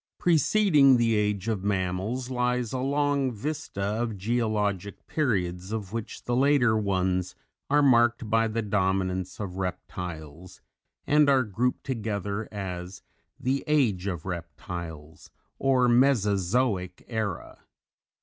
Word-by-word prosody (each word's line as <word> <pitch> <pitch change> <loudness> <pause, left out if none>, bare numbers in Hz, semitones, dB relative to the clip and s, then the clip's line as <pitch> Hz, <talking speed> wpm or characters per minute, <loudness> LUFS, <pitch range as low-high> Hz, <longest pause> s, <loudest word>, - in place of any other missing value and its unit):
_ - - -67
Preceding 155 -5 +4
the 115 -1 +2
Age 105 -1 0
of 105 -4 -1
Mammals 100 +6 -2
lies 125 -1 0
a 130 - -1
long 140 0 +1
vista 115 -3 -4
of 110 +2 -2
geologic 105 -2 -1
periods 95 - -1
of 105 -3 -4
which 115 -2 -5
the 120 - -1
later 130 -4 +4
ones 95 -3 0 0.3
are 145 +1 +4
marked 120 -3 +4
by 115 +1 +2
the 115 +1 -2
dominance 95 -2 -1
of 95 -3 -5
Reptiles, 90 -3 -6 0.5
and 150 -1 +4
are 135 -2 +4
grouped 120 +4 -1
together 105 -4 -3
as 95 -2 -6 0.4
the 135 +2 -1
Age 115 -11 +2
of 85 -5 -4
Reptiles 85 -3 -7 0.3
or 130 -2 +3
Mesozoic 105 -5 +2
Era. 110 -3 -4
110 Hz, 120 wpm, -27 LUFS, 95-125 Hz, 0.5 s, Preceding